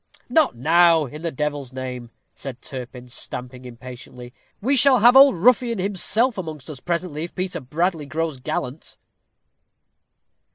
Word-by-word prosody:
"Not 315 Hz, -, +3 dB
now, 165 Hz, +4 st, +4 dB
in 150 Hz, +4 st, -9 dB
the 170 Hz, -, -2 dB
devil's 145 Hz, -3 st, -4 dB
name!" 125 Hz, -2 st, -6 dB, 0.2 s
said 130 Hz, -2 st, -8 dB
Turpin, 125 Hz, -3 st, -9 dB
stamping 125 Hz, +1 st, -6 dB
impatiently. 125 Hz, 0 st, -11 dB, 0.3 s
"We 265 Hz, +7 st, +1 dB
shall 270 Hz, 0 st, +5 dB
have 240 Hz, +3 st, +6 dB
Old 275 Hz, -4 st, +8 dB
Ruffin 235 Hz, +5 st, +3 dB
himself 205 Hz, +4 st, 0 dB
amongst 155 Hz, -4 st, -7 dB
us 140 Hz, -, -9 dB
presently, 170 Hz, -1 st, -3 dB
if 175 Hz, -, -13 dB
Peter 185 Hz, 0 st, -2 dB
Bradley 155 Hz, +3 st, -2 dB
grows 155 Hz, -1 st, -3 dB
gallant." 125 Hz, +3 st, -5 dB
155 Hz, 135 wpm, -22 LUFS, 130-185 Hz, 0.3 s, Old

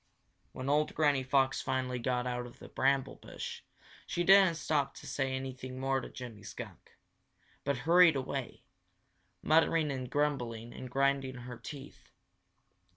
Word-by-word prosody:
When 130 Hz, -, -6 dB
old 150 Hz, +2 st, +2 dB
Granny 145 Hz, -3 st, +3 dB
Fox 130 Hz, 0 st, +2 dB
finally 130 Hz, -1 st, -1 dB
got 125 Hz, +1 st, -1 dB
out 125 Hz, 0 st, -3 dB
of 120 Hz, -, -14 dB
the -, -, -11 dB
bramble 135 Hz, 0 st, +1 dB
bush, -, -, -7 dB, 0.5 s
she 175 Hz, -, -1 dB
didn't 190 Hz, -2 st, +7 dB
stop 145 Hz, -3 st, 0 dB
to -, -, -11 dB
say 135 Hz, -2 st, -1 dB
anything 130 Hz, -1 st, -6 dB
more 135 Hz, 0 st, 0 dB
to -, -, -8 dB
Jimmy 120 Hz, -5 st, -9 dB
Skunk, -, -, -10 dB, 0.7 s
but 140 Hz, -1 st, 0 dB
hurried 170 Hz, -1 st, +7 dB
away, 135 Hz, -1 st, -4 dB, 0.8 s
muttering 160 Hz, -1 st, +3 dB
and 130 Hz, -2 st, -4 dB
grumbling 120 Hz, -6 st, -1 dB
and 130 Hz, -, -8 dB
grinding 135 Hz, 0 st, +1 dB
her 120 Hz, 0 st, -8 dB
teeth. 145 Hz, -1 st, -10 dB
135 Hz, 145 wpm, -32 LUFS, 125-145 Hz, 0.8 s, didn't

